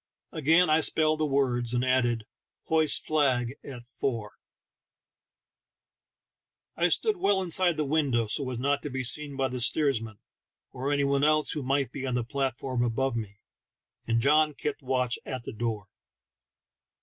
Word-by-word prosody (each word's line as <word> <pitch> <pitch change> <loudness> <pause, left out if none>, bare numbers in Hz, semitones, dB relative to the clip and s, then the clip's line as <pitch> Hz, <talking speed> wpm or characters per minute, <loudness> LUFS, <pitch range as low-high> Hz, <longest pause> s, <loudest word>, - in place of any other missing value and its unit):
Again 165 +3 +3
I 155 +1 +4
.spelled 155 -1 +2
the 155 - +1
words, 125 -4 0
and 125 +1 +1
added, 120 -3 +1 0.4
"Hoist 160 -2 +2
flag 130 -6 +1
at 125 -3 -9
fore." 120 -4 -4 2.4
I 175 - +2
stood 425 - +1
well 200 - +2
inside 180 -2 +2
the 155 - 0
window, 140 -6 +1
so 130 +5 -3
as 125 - -4
not 140 +3 0
to 150 - -5
be 130 -1 -3
seen 145 +3 0
by 135 -1 +1
the 130 -1 -5
steersman, 115 -6 +1 0.5
or 135 +3 -3
any 145 -1 +1
one 140 0 +1
else 155 0 +2
who 150 - -2
might 135 +1 0
be 135 -1 -5
on 125 - -1
the 120 - 0
platform 130 0 -2
above 120 +2 -1
me, 105 -3 -6 0.7
and 115 0 +2
John 150 +3 +3
kept 150 +1 -4
watch 125 -2 -1
at 130 -2 -6
the - - -7
door. 110 -3 -3
135 Hz, 160 wpm, -27 LUFS, 120-150 Hz, 2.4 s, I